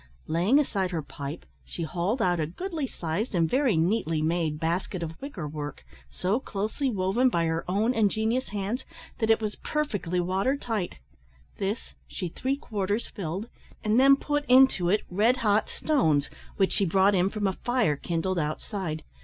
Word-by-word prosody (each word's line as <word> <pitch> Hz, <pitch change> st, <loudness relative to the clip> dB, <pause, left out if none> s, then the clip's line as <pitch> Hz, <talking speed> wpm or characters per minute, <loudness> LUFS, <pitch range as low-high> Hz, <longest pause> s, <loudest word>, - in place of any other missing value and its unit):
Laying 175 Hz, -, +3 dB
aside 200 Hz, -10 st, +1 dB
her 165 Hz, -4 st, -3 dB
pipe, 145 Hz, +3 st, -7 dB, 0.2 s
she 170 Hz, -, -6 dB
hauled 185 Hz, -, -1 dB
out 175 Hz, -1 st, +2 dB
a 155 Hz, -, 0 dB
goody 320 Hz, -, -4 dB
sized 185 Hz, +3 st, -3 dB
and 165 Hz, -2 st, +3 dB
very 255 Hz, -, +2 dB
neatly 165 Hz, -2 st, +1 dB
made 160 Hz, -1 st, 0 dB
basket 170 Hz, +2 st, -1 dB
of 165 Hz, 0 st, -7 dB
wicker 215 Hz, -, -5 dB
work, 145 Hz, -, -6 dB, 0.2 s
so 190 Hz, -, 0 dB
closely 220 Hz, +4 st, -2 dB
woven 210 Hz, +4 st, +2 dB
by 170 Hz, -8 st, +1 dB
her 165 Hz, 0 st, -1 dB
own 215 Hz, +6 st, +2 dB
ingenious 220 Hz, +2 st, +1 dB
hands, 205 Hz, +5 st, -2 dB, 0.4 s
that 220 Hz, -2 st, +1 dB
it 225 Hz, -, +5 dB
was 215 Hz, -1 st, -3 dB
perfectly 205 Hz, -, -1 dB
water 190 Hz, +10 st, +1 dB
tight; 225 Hz, -9 st, -3 dB, 0.6 s
this 200 Hz, +3 st, -3 dB
she 180 Hz, -3 st, -4 dB
three 265 Hz, +10 st, -2 dB
quarters 210 Hz, -4 st, -2 dB
filled, 190 Hz, +3 st, -4 dB, 0.4 s
and 215 Hz, +2 st, +3 dB
then 275 Hz, +1 st, +7 dB
put 290 Hz, +1 st, -1 dB
into 255 Hz, -9 st, +5 dB
it 210 Hz, +3 st, +2 dB
red 220 Hz, +7 st, +3 dB
hot 210 Hz, +1 st, +3 dB
stones, 160 Hz, -, +1 dB, 0.3 s
which 195 Hz, -2 st, +3 dB
she -, -, +1 dB
brought 195 Hz, +3 st, +4 dB
in 185 Hz, 0 st, +3 dB
from 210 Hz, 0 st, -2 dB
a 190 Hz, -, +2 dB
fire 240 Hz, -, +1 dB
kindled 170 Hz, +4 st, -1 dB
outside. 155 Hz, +1 st, -3 dB
195 Hz, 170 wpm, -27 LUFS, 170-235 Hz, 0.6 s, then